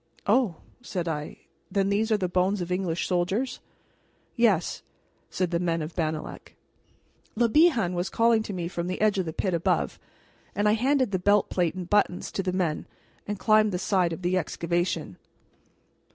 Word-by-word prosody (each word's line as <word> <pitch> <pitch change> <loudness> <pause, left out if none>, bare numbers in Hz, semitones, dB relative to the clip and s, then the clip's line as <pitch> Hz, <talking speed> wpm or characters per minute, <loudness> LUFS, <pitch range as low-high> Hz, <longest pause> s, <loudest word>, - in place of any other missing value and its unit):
"Oh!" 215 -4 +3 0.3
said 180 -8 -4
I; 150 -2 -4 0.3
"then 195 -1 +1
these 215 +3 +1
are 215 - +4
the 185 -3 -1
bones 185 +3 +1
of 175 0 -4
English 180 -2 -1
soldiers?" 190 +9 -1 0.8
"Yes," 215 -8 +2 0.5
said 180 -2 -1
the 170 - +1
men 165 -2 0
of 155 +2 -7
Bannalec. 155 -2 -4 0.8
Le 235 +1 +3
Bihan 240 - +4
was 175 +1 -2
calling 230 -1 +3
to 215 - -6
me 175 -3 -3
from 170 0 -4
the 185 - -3
edge 210 -2 +2
of 180 - -1
the - - -2
pit 185 +3 -2
above, 170 0 0 0.6
and 205 +1 +1
I - - +5
handed 255 +1 +2
the 185 - 0
belt 205 +2 +3
plate 175 -2 0
and 180 -2 -5
buttons 200 -2 +1
to - - -2
the 185 -1 -1
men 180 -4 -1 0.4
and 205 0 -3
climbed 215 0 +4
the 180 - -1
side 185 -1 +1
of 165 +3 -6
the 185 +1 +2
excavation. 170 - -2
185 Hz, 180 wpm, -26 LUFS, 175-210 Hz, 0.8 s, I